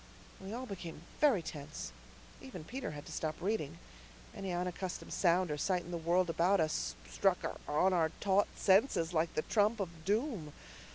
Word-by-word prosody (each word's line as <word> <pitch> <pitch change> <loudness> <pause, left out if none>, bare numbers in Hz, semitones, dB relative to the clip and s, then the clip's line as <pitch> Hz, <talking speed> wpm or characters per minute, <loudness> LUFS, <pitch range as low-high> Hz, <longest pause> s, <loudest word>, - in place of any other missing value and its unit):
We 190 +1 -7
all 245 +3 -4
became 175 -7 -7 0.2
very 260 - +4
tense. 145 - -6 0.5
Even 130 - -8
Peter 255 +10 -4
had 150 -1 -7
to - - -9
stop 155 -1 -2
reading. 185 - -1 0.6
Any 195 -1 -4
unaccustomed 180 +1 -3
sound 180 -1 +3
or 150 - -2
sight 180 +2 +1
in 175 - -9
the 170 - -1
world 170 +2 +2
about 175 +4 +3
us 155 - 0
struck - - +2 0.3
on 180 +6 +3
our 165 -3 +3
taut 200 0 +3
senses 190 -4 +3
like 160 0 +1
the 155 - +1
trump 215 +1 +2
of 195 -3 -1
doom. 205 - 0
180 Hz, 170 wpm, -34 LUFS, 160-200 Hz, 0.6 s, very